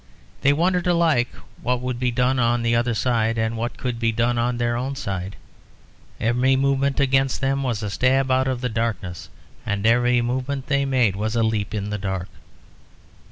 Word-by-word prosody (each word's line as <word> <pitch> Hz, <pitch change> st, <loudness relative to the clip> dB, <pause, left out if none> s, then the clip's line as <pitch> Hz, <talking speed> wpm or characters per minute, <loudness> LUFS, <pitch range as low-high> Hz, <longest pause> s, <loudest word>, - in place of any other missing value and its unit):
They 140 Hz, -, +4 dB
wondered 180 Hz, +4 st, +1 dB
alike 165 Hz, -8 st, +3 dB, 0.3 s
what 125 Hz, 0 st, 0 dB
would 125 Hz, -1 st, -3 dB
be 125 Hz, 0 st, +1 dB
done 125 Hz, +2 st, +1 dB
on 120 Hz, 0 st, +2 dB
the 115 Hz, 0 st, +2 dB
other 120 Hz, 0 st, +1 dB
side 115 Hz, -1 st, +1 dB
and 110 Hz, +1 st, 0 dB
what 120 Hz, +1 st, -4 dB
could 125 Hz, -2 st, -3 dB
be 115 Hz, -1 st, +1 dB
done 120 Hz, +2 st, 0 dB
on 120 Hz, +1 st, 0 dB
their 120 Hz, 0 st, 0 dB
own 130 Hz, +3 st, -3 dB
side; 95 Hz, -5 st, -4 dB, 0.8 s
every 125 Hz, +3 st, +2 dB
movement 140 Hz, +1 st, +1 dB
against 135 Hz, -1 st, +2 dB
them 135 Hz, 0 st, 0 dB
was 120 Hz, -5 st, -2 dB
a 105 Hz, -, -2 dB
stab 130 Hz, +3 st, +2 dB
out 130 Hz, +1 st, +2 dB
of 130 Hz, -2 st, -2 dB
the 125 Hz, -, 0 dB
darkness 110 Hz, -6 st, -3 dB, 0.3 s
and 100 Hz, +1 st, -2 dB
every 120 Hz, +2 st, +4 dB
movement 130 Hz, +2 st, -2 dB
they 140 Hz, -1 st, +1 dB
made 125 Hz, -7 st, +2 dB
was 110 Hz, +3 st, -2 dB
a 115 Hz, -, +2 dB
leap 110 Hz, -1 st, -1 dB
in 105 Hz, 0 st, -3 dB
the 105 Hz, -, -3 dB
dark. 95 Hz, -2 st, -3 dB
120 Hz, 190 wpm, -23 LUFS, 115-130 Hz, 0.8 s, They